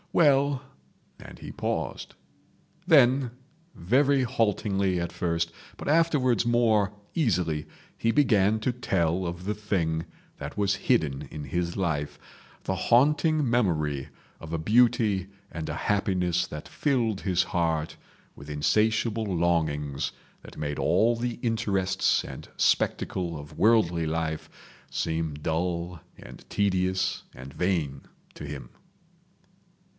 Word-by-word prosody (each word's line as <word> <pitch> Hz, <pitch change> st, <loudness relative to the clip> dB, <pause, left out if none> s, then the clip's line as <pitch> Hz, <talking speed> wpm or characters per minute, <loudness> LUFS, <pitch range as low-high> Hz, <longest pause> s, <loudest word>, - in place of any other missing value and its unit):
"Well"—and 140 Hz, -2 st, 0 dB
he -, -, -8 dB
paused. -, -, -3 dB, 0.7 s
Then 135 Hz, -5 st, +5 dB, 0.4 s
very 135 Hz, +9 st, +3 dB
haltingly 100 Hz, -5 st, 0 dB
at 85 Hz, 0 st, -3 dB
first, 85 Hz, -1 st, -1 dB, 0.3 s
but -, -, -7 dB
afterwards 145 Hz, -7 st, +3 dB
more 115 Hz, -4 st, +3 dB, 0.2 s
easily, 90 Hz, -, 0 dB, 0.3 s
he 115 Hz, -, +1 dB
began 110 Hz, -6 st, +3 dB
to 125 Hz, +2 st, 0 dB
tell 90 Hz, -7 st, 0 dB
of 85 Hz, +1 st, -6 dB
the 105 Hz, -, 0 dB
thing 90 Hz, -6 st, -1 dB, 0.3 s
that 70 Hz, +5 st, -7 dB
was 100 Hz, -1 st, +2 dB
hidden 80 Hz, -, +1 dB
in 75 Hz, -2 st, -6 dB
his 85 Hz, +5 st, -2 dB
life, 80 Hz, -6 st, -1 dB, 0.5 s
the 95 Hz, -, -1 dB
haunting 150 Hz, -, +3 dB
memory 75 Hz, -, 0 dB, 0.3 s
of 80 Hz, -, -9 dB
a 85 Hz, -, -1 dB
beauty 110 Hz, 0 st, +3 dB, 0.2 s
and 80 Hz, -2 st, -5 dB
a -, -, -3 dB
happiness 90 Hz, -4 st, +1 dB
that 75 Hz, -, -8 dB
filled 120 Hz, -8 st, 0 dB
his 90 Hz, -3 st, +2 dB
heart 80 Hz, -2 st, -1 dB, 0.4 s
with 70 Hz, +2 st, -11 dB
insatiable 110 Hz, +9 st, +1 dB
longings 80 Hz, -6 st, 0 dB, 0.3 s
that -, -, -13 dB
made 75 Hz, -1 st, -3 dB
all 120 Hz, +2 st, +3 dB
the 120 Hz, 0 st, -2 dB
interests 100 Hz, -5 st, +1 dB
and -, -, -9 dB
spectacle 85 Hz, -3 st, +1 dB
of 75 Hz, 0 st, -11 dB
worldly 90 Hz, -8 st, +3 dB
life 80 Hz, -1 st, -2 dB, 0.4 s
seem 80 Hz, -2 st, -2 dB
dull 85 Hz, +2 st, -2 dB, 0.2 s
and 65 Hz, -, -12 dB
tedious 95 Hz, -2 st, 0 dB
and 65 Hz, +2 st, -10 dB
vain 80 Hz, -7 st, -1 dB, 0.3 s
to -, -, -8 dB
him. 70 Hz, -4 st, -7 dB
95 Hz, 120 wpm, -27 LUFS, 80-115 Hz, 0.7 s, Then